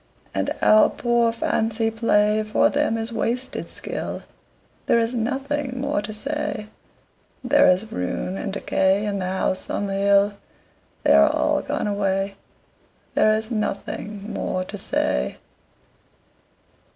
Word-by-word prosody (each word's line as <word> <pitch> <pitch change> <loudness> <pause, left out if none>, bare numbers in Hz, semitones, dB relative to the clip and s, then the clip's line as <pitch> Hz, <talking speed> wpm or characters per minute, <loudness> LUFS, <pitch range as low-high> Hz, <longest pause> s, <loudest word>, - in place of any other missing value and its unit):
And - - 0
our 215 0 +6
poor 235 -1 +1
fancy 225 0 0
play 215 -1 +2
For 215 0 +2
them 285 -5 +1
is 225 +1 -3
wasted 245 +3 -2
skill: - - -5 0.6
There - - +4
is 230 +1 +1
nothing 265 +2 -2
more 255 -6 0
to 210 +1 -6
say. 215 -2 -3 0.7
There 285 +3 +5
is 185 +4 +1
ruin 90 - -3
and 195 0 -4
decay 195 +1 +1
In 200 -1 -2
the 185 - -2
House 185 0 -1
on 205 - -1
the 195 - -3
Hill 200 +1 +3 0.7
They - - +5
are 70 0 +7
all - - +1
gone - - -2
away, 195 -1 0 0.8
There 215 - +4
is 220 +2 -1
nothing 210 -1 -4
more 185 - -2
to 195 - -8
say. 65 - -1
215 Hz, 135 wpm, -23 LUFS, 200-235 Hz, 0.8 s, are